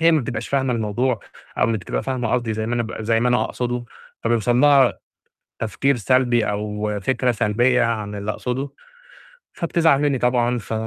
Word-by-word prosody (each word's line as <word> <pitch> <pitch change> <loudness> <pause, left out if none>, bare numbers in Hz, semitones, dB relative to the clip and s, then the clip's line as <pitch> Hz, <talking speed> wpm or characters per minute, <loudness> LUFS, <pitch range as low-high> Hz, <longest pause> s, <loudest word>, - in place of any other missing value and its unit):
هي 165 +1 +5
ما 155 - +3
بتبقاش 120 -2 -4
فاهمة 135 -2 +1
الموضوع، 115 +1 -1 0.4
أو - - +4
ما 115 - +1
بتبقي 105 -5 -3
فاهمة 125 -4 -2
قصدي 120 -3 0
زي 110 0 -3
ما 120 - -1
أنا 120 - 0
ب 110 0 -6
زي 115 +1 +1
ما 125 - +2
أنا 125 - +2
أقصده، 120 -1 -3 0.4
فبيوصل 120 +1 +2
لها 140 -3 +5 0.6
تفكير 135 +5 0
سلبي 120 0 +2
أو 105 +1 -3
فكرة 130 +3 +1
سلبية 120 +3 +2
عن 110 -3 -1
اللي 100 +1 -3
أقصده، 125 +5 -3 0.9
فبتزعل 165 -4 +2
مني 145 -3 +2
طبعًا، 125 0 +1
ف 115 -1 -6
120 Hz, 175 wpm, -21 LUFS, 110-130 Hz, 0.9 s, هي